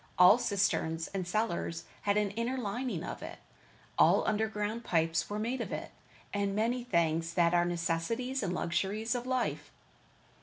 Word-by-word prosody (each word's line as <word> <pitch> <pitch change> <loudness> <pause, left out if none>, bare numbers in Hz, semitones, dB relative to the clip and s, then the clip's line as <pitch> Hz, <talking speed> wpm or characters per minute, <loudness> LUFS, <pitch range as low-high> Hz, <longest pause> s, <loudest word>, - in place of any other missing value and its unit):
All 180 +6 +8
cisterns 190 -7 0
and 190 -3 -3
cellars 175 -4 -1 0.2
had 205 0 +1
an 210 -2 +1
inner 230 +5 -2
lining 245 +2 -3
of - - -6
it. - - -7 0.6
All - - +5
underground 215 +1 -1
pipes 165 -1 +1
were 205 - -3
made 235 +4 -2
of - - -4
it, - - -5 0.4
and 200 -1 0
many 235 +3 0
things 165 -6 0
that 170 -1 +4
are 175 0 +4
the - - -1
necessities 175 +10 -1
and 195 -4 -1
luxuries 195 +6 -1
of 245 0 -3
life. 255 -1 -1
205 Hz, 160 wpm, -31 LUFS, 175-230 Hz, 0.6 s, All